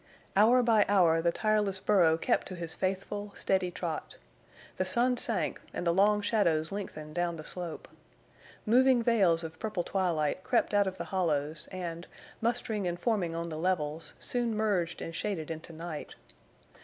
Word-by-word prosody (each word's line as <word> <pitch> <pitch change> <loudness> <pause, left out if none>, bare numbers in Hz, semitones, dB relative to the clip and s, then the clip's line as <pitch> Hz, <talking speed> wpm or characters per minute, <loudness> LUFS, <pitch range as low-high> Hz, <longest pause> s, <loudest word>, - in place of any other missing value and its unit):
Hour 235 +5 +6
by 225 -3 +5
hour 170 -5 +4
the 170 +1 +2
tireless 210 -1 +1
burro 175 -6 +4
kept - - 0
to 185 - -6
his 170 -2 -4
faithful, 195 +2 -3
steady 190 -2 +1
trot. 170 -3 -5 0.6
The - - +1
sun 240 +7 +3
sank 220 -9 -1
and - - -3
the 170 - +3
long 205 +3 +4
shadows 170 -8 +1
lengthened 155 -6 -6
down 175 0 -1
the 155 - -8
slope. 175 0 -5 0.8
Moving 250 +2 +4
veils 190 -8 +3
of 160 0 -8
purple 210 -5 -2
twilight 175 -3 0
crept - - +1
out 205 -1 +4
of 190 0 -4
the - - -3
hollows 155 -4 -1
and, 175 -2 -5 0.3
mustering 225 -4 0
and 175 0 -3
forming 180 -5 0
on 170 0 -3
the 155 -1 -5
levels, 160 -3 -2
soon 240 -3 -1
merged 195 -6 0
and 165 - -6
shaded 170 -5 -3
into 160 +1 -7
night. 165 -1 -7
185 Hz, 165 wpm, -30 LUFS, 165-210 Hz, 0.8 s, Hour